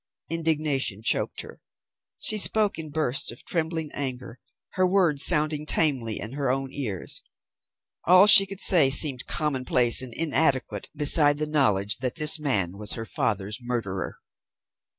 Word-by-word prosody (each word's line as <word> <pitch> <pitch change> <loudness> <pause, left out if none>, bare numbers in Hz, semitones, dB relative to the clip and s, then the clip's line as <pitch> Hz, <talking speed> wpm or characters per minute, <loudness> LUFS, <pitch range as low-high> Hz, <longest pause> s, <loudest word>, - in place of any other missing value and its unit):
Indignation 150 -9 0
choked - - 0
her. - - -14 0.6
She 215 - +1
spoke 210 -2 +1
in 155 -1 -7
bursts 145 -4 -1
of 120 - -7
trembling 160 -2 -3
anger, 130 -3 -6 0.3
her 185 0 0
words 180 -7 +3
sounding 150 -2 +2
tamely 130 -11 +1
in 110 - -7
her 140 -1 -3
own 135 +1 -3
ears. 110 -11 -5 0.8
All 185 +3 +6
she 195 -1 +8
could 195 0 -8
say 165 -8 +5
seemed 135 -2 +1
commonplace 130 -6 0
and 130 -2 -5
inadequate 150 -4 0
beside 145 0 +2
the 155 - -3
knowledge 105 -10 0
that 130 -2 -4
this 155 0 0
man 100 - -2
was 105 - -5
her 115 - -6
father's 105 - -3
murderer. 115 -6 -5
140 Hz, 145 wpm, -24 LUFS, 120-160 Hz, 0.8 s, she